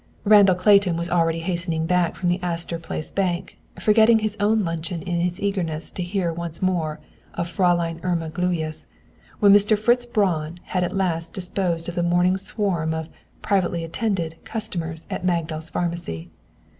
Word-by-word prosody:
Randall 205 -3 +6
Clayton 185 -2 +4
was 170 +1 -3
already 165 -1 +2
hastening 170 -2 -1
back 180 0 +1
from 180 - -2
the 175 +1 +1
Astor 170 -1 -2
Place 160 -1 -5
Bank, 185 -1 -2 0.2
forgetting 220 +1 +5
his 215 -1 -2
own 210 +1 +2
luncheon 165 0 -4
in 175 -2 -2
his 175 0 -1
eagerness 175 -6 -2
to - - -5
hear 175 -1 -1
once 170 -1 -5
more 170 -4 -1 0.4
of 170 - -2
Fräulein 175 -3 +1
Irma 170 -3 -1
Gluyas, 165 -2 -2 0.5
when 200 -1 +7
Mr. 205 +1 +6
Fritz 240 +3 +2
Braun 175 -7 0
had 180 -1 -1
at 175 - -2
last 165 -3 -1
disposed 180 -2 -2
of 175 - -4
the 175 - -1
morning 175 +2 +2
swarm 190 -5 -1
of 160 0 -5 0.3
"privately 180 -4 +1
attended" 165 -2 -2
customers 170 -8 -4
at - - -3
Magdal's 165 -3 -1
Pharmacy. 170 - -4
175 Hz, 160 wpm, -23 LUFS, 165-195 Hz, 0.5 s, when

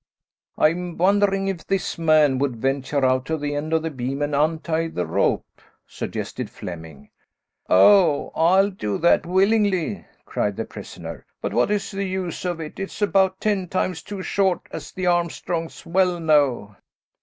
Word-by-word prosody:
"I'm 175 +2 +1
wondering 195 +1 +2
if 190 -4 -4
this 195 -3 -1
man 155 -5 +4
would 135 -3 0
venture 135 +3 0
out 130 0 +2
to 160 - -1
the 145 -1 -3
end 145 +2 -3
of 160 -1 +1
the 160 - -2
beam 135 +1 -3
and 145 0 -2
untie 160 +2 0
the 90 - -3
rope," 80 - +1 0.4
suggested - - -5
Flemming. 80 -5 -9 0.6
"Oh, 155 - +5
I'll 190 +5 +4
do 105 - -3
that, 170 +1 +3
willingly," 195 0 +2 0.2
cried - - -1
the - - -2
prisoner. - - -9 0.2
"But - - -4
what - - +2
is 210 -1 -1
the 200 0 -3
use 185 -1 -4
of 175 -2 -2
it; 155 +2 -7
it's 195 0 -6
about 190 -2 +2
ten 200 -4 0
times 180 -2 -2
too 200 +1 -7
short, 190 -2 +1
as 155 -2 -7
the 185 - -4
Armstrongs 170 -1 -1
well 180 0 +1
know." 140 -10 +2
165 Hz, 160 wpm, -23 LUFS, 145-190 Hz, 0.6 s, Oh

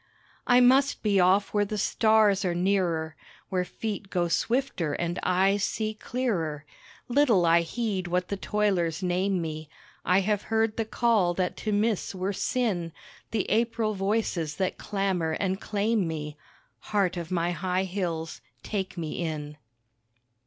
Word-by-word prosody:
I 245 0 +6
must 265 +3 +4
be 205 -3 +3
off 190 +3 +3
where 205 -1 +3
the 210 +1 -3
stars 215 -1 +3
are 175 -2 0
nearer, 175 -4 0 0.3
Where 185 -1 0
feet 200 +2 -5
go 175 -3 0
swifter 230 - 0
and 175 +3 -2
eyes 195 +2 +2
see 215 +1 -1
clearer, 185 - -2 0.4
Little 240 -8 +3
I 170 0 +5
heed 190 0 -2
what 180 +1 -1
the 200 - -1
toilers 190 -5 0
name 185 +1 +1
me 155 -2 -5 0.3
I 185 +2 +3
have 205 +1 0
heard 220 0 +1
the 225 - -1
call 215 -6 +2
that 180 -1 -1
to 215 - -3
miss 205 -1 0
were 190 +2 -2
sin, 190 -8 -1 0.4
The 220 -3 -1
April 225 -1 +1
voices 195 -6 -1
that 185 +2 -2
clamour 190 -5 -1
and 190 -1 -1
claim 210 -2 0
me, 150 -2 -5 0.4
(Heart 195 -4 0
of 170 -2 -5
my 175 -1 0
high 180 +2 -1
hills, 175 -4 -3 0.2
take 190 -3 -4
me 160 0 -4
in.) 150 -2 -4
190 Hz, 150 wpm, -27 LUFS, 175-215 Hz, 0.4 s, I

